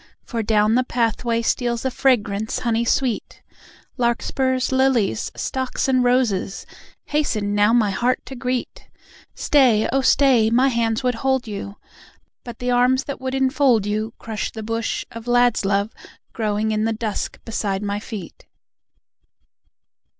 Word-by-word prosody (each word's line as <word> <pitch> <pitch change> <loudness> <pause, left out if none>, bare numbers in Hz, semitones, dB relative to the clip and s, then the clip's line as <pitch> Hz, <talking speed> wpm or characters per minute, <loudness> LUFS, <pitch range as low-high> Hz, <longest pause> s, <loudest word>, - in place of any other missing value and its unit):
For 230 -2 -3
down 215 0 +2
the 255 +2 +3
path 235 -3 -1
way 230 -1 0
Steals 235 +1 -1
a 260 - 0
fragrance 220 -5 +1
honey 235 -1 0
sweet. 245 -1 -1 0.5
Larkspurs, 255 +2 0
lilies, 260 - +1
stocks, 260 0 -2
and 255 -1 +3
roses, 240 -6 0 0.4
Hasten 215 -9 -1
now 205 +1 +4
my 225 -4 +3
heart 245 +6 +1
to 265 - -8
greet. 250 0 -4 0.5
Stay, 250 -7 +3
oh, 270 - +3
stay! 260 -5 +4
My 250 +4 +3
hands 230 0 0
would 250 -1 +1
hold 265 -2 0
you... 200 -1 -6 0.7
But 240 -2 -9
the 250 0 -2
arms 250 +2 +3
that 280 -2 -6
would 260 0 -3
enfold 265 -5 +2
you 215 +2 -2
Crush 220 -2 -4
the 220 - -7
bush 225 +1 -2
of 230 +1 -9
lad's 245 -3 +3
love 200 +2 0 0.4
growing 215 -1 -1
in 215 0 0
the 225 - 0
dusk 220 -2 -4
beside 205 -3 -2
my 205 0 -2
feet. 205 -5 -9
235 Hz, 145 wpm, -21 LUFS, 215-255 Hz, 0.7 s, now